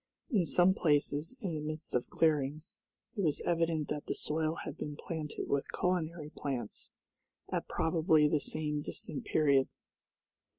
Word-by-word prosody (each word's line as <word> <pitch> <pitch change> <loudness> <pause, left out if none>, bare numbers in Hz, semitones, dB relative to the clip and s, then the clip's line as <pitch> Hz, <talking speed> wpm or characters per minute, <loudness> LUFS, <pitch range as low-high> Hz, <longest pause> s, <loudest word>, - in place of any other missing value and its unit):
In 190 -8 +3
some 180 +1 +5
places, 150 - +1
in 190 -6 -2
the 155 - -2
midst 155 +1 -4
of 125 - 0
clearings, 155 -1 +1 0.4
it 200 - -1
was 155 -6 +2
evident 165 -3 +1
that 150 -1 -3
the - - -1
soil 155 +1 -1
had 145 - -5
been 150 -2 -5
planted 155 0 -4
with 140 0 0
culinary 170 -4 -1
plants, 125 -6 -4 0.6
at - - -1
probably 160 -2 +3
the 150 0 +2
same 150 0 -2
distant 145 - -6
period. 140 -4 +4
155 Hz, 145 wpm, -33 LUFS, 145-165 Hz, 0.6 s, some